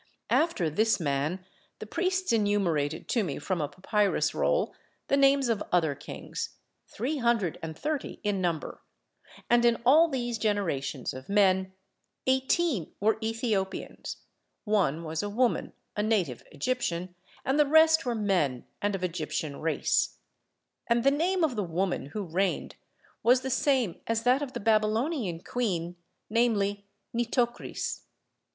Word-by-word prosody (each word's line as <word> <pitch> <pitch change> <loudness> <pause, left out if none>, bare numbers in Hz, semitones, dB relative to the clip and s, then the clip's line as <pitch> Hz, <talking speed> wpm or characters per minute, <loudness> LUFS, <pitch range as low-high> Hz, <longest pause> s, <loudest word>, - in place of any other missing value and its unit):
After 315 - +2
this 215 +9 +2
man 155 +4 -1 0.3
the - - -7
priests 370 - 0
enumerated 185 -9 +1
to 230 - +2
me 150 -7 -3
from 170 +3 -2
a 150 - 0
papyrus 200 +5 0
roll - - +1 0.4
the - - +4
names 275 -1 +4
of 225 -3 0
other 165 -5 +3
kings, - - -6 0.3
three 270 +8 -3
hundred 235 - +1
and 160 -1 -6
thirty 300 -2 -3
in 205 -2 0
number; 170 -4 -2 0.7
and 240 0 +4
in 235 -1 +4
all 310 +7 +7
these 240 -6 -2
generations 165 - -1
of 130 +5 -10
men 190 -2 +3 0.5
eighteen 265 - +1
were 220 +2 +2
Ethiopians, 220 -4 -2 0.5
one 185 - +1
was 160 0 -3
a 205 - -3
woman, 240 +3 +1 0.2
a 210 - 0
native 205 - 0
Egyptian, 180 - -2 0.3
and 270 +3 +1
the 295 - +5
rest 320 +2 +6
were 245 -2 -1
men 180 - 0 0.2
and 205 0 0
of 185 - -5
Egyptian 160 -4 -3
race: 160 0 +1 0.7
and 235 0 +2
the 275 - +5
name 350 +5 +1
of 290 -6 +1
the 210 - 0
woman 175 -4 -1
who 200 +8 -4
reigned 185 +2 -1 0.5
was 250 +2 +5
the 265 0 -3
same 255 - +1
as 230 0 0
that 255 +3 +4
of 275 -3 -4
the 240 - -3
Babylonian 215 - +1
queen, 180 -8 -2 0.3
namely 205 -3 +1 0.3
Nitocris. 240 +1 -1
210 Hz, 145 wpm, -28 LUFS, 175-245 Hz, 0.7 s, all